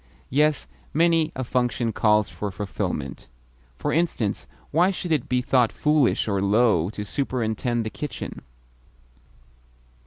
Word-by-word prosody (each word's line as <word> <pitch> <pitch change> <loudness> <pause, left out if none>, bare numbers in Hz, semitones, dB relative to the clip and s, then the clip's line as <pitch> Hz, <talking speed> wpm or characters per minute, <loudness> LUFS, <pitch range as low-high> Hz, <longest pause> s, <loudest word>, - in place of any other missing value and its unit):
Yes, 150 +3 +2 0.3
many 165 -1 +3
a 130 - -2
function 125 -2 0
calls 105 -1 +3
for 105 - -5
fulfilment. 95 +1 -4 0.5
For 145 - -1
instance, 160 - 0 0.2
why 175 +5 +4
should 180 -3 -4
it 150 -6 0
be 125 0 +1
thought 125 -3 +3
foolish 150 -6 +2
or 100 -2 0
low 100 -4 +3
to 105 0 -6
superintend 120 -2 -1
the 110 - -3
kitchen? 150 - -6
125 Hz, 125 wpm, -24 LUFS, 105-150 Hz, 0.5 s, why